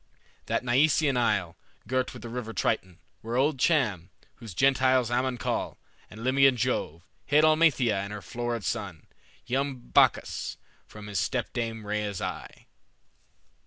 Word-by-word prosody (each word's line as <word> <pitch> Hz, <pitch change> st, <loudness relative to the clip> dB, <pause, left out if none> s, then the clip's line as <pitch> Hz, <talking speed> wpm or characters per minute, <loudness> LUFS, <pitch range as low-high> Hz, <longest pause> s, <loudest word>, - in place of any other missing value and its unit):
That -, -, 0 dB
Nyseian 140 Hz, +3 st, +3 dB
isle, 95 Hz, -8 st, 0 dB, 0.3 s
Girt 130 Hz, +2 st, 0 dB
with -, -, -11 dB
the 120 Hz, -, -6 dB
river 115 Hz, -1 st, -5 dB
Triton, 90 Hz, -2 st, -1 dB, 0.2 s
where 115 Hz, +2 st, -4 dB
old 135 Hz, +2 st, +1 dB
Cham, 110 Hz, -, +1 dB, 0.3 s
Whom 115 Hz, -, -11 dB
Gentiles 130 Hz, +2 st, +2 dB
Ammon 125 Hz, +1 st, 0 dB
call, -, -, -3 dB, 0.3 s
and 110 Hz, +2 st, -10 dB
Libyan 135 Hz, 0 st, +4 dB
Jove, 85 Hz, -6 st, -2 dB, 0.2 s
Hid 150 Hz, +2 st, +4 dB
Amalthea 155 Hz, -9 st, +4 dB
and 100 Hz, +1 st, -6 dB
her 105 Hz, -2 st, -7 dB
florid 120 Hz, +3 st, -4 dB
son, 100 Hz, -9 st, -4 dB, 0.4 s
Young 135 Hz, +2 st, -1 dB
Bacchus, 120 Hz, -, +1 dB, 0.3 s
from 105 Hz, -1 st, -11 dB
his 105 Hz, -1 st, -2 dB
stepdame 115 Hz, -3 st, -2 dB
Rhea's 105 Hz, -2 st, -2 dB
eye." -, -, -6 dB
120 Hz, 135 wpm, -27 LUFS, 105-130 Hz, 0.4 s, Libyan